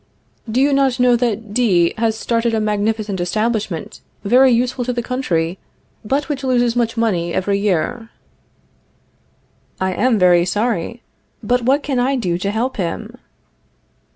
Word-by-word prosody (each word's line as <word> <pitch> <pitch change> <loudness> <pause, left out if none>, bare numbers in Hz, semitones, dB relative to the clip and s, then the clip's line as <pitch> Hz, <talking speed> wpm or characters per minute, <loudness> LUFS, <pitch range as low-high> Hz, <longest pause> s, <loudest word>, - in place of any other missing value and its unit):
Do 230 +4 0
you 280 +1 +3
not 270 -2 +2
know 250 -1 +4
that 225 -3 -2
D 190 -8 +3
has 220 -1 0
started 230 0 0
a - - +1
magnificent 210 -2 -1
establishment 210 -1 -2 0.2
very 255 +6 +5
useful 245 +1 0
to 250 - -1
the 240 0 -3
country, 185 -9 -2 0.4
but 275 +7 -1
which 285 -3 -4
loses 245 -2 +1
much 230 -1 0
money 180 -7 0
every 200 +1 0
year? 210 +4 -1 1.7
I 190 0 0
am 245 +3 +2
very 180 -2 +4
sorry. 215 +3 -2 0.4
But 245 +4 +1
what 270 +4 +2
can 270 -3 -1
I 265 +3 +1
do 180 -9 -1
to 195 - -2
help 230 +5 -2
him? 170 -4 -4
225 Hz, 150 wpm, -18 LUFS, 200-245 Hz, 1.7 s, very